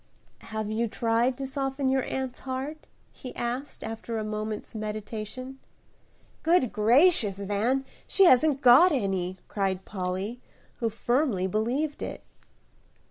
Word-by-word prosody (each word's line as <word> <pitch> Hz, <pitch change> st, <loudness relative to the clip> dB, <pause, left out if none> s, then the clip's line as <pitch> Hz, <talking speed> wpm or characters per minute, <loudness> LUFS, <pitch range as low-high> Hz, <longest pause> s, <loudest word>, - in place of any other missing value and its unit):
"Have 215 Hz, -1 st, -5 dB
you 230 Hz, +2 st, 0 dB
tried 230 Hz, +3 st, +1 dB
to 275 Hz, -, -4 dB
soften 270 Hz, 0 st, -2 dB
your 265 Hz, 0 st, +2 dB
aunt's 265 Hz, -1 st, -4 dB
heart?" 270 Hz, +4 st, -5 dB, 0.2 s
he 255 Hz, -, -9 dB
asked, 245 Hz, +4 st, -4 dB
after 225 Hz, +1 st, -5 dB
a 215 Hz, -, -2 dB
moment's 215 Hz, 0 st, -4 dB
meditation. 215 Hz, +4 st, -6 dB, 0.8 s
"Good 325 Hz, -8 st, +3 dB
gracious, 235 Hz, -, +4 dB
Van, 210 Hz, +7 st, 0 dB, 0.2 s
she 390 Hz, -, +5 dB
hasn't 280 Hz, -1 st, +5 dB
got 270 Hz, +9 st, +8 dB
any," 190 Hz, -, -1 dB
cried 190 Hz, -2 st, -2 dB
Polly, 190 Hz, +5 st, -4 dB, 0.4 s
who 230 Hz, -, 0 dB
firmly 240 Hz, -3 st, 0 dB
believed 245 Hz, +10 st, -1 dB
it. -, -, -5 dB
235 Hz, 125 wpm, -27 LUFS, 215-265 Hz, 0.8 s, got